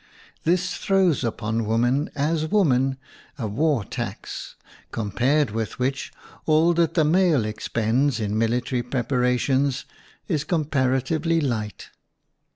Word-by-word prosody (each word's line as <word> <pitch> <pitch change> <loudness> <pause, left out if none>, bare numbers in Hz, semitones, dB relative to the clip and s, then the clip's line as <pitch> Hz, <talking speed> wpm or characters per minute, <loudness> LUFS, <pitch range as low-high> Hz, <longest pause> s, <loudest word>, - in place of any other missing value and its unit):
This 180 +2 +1
throws 190 -8 +2
upon 115 -1 -2
woman 120 +6 +1
as 155 +2 0
woman 135 -9 +2 0.4
a 120 - -3
war 135 +3 +1
tax, - - -6 0.4
compared 125 +5 +1
with 110 0 -3
which 135 +2 -2 0.4
all 160 +2 +4
that 170 -1 +1
the 160 - +4
male 165 - +3
expends 115 +4 0
in 105 -1 -2
military 120 +3 0
prepara 125 0 0
tions 135 +1 0 0.4
is 155 -5 0
comparatively 150 +1 0
light. 110 - -3
135 Hz, 115 wpm, -24 LUFS, 115-155 Hz, 0.4 s, all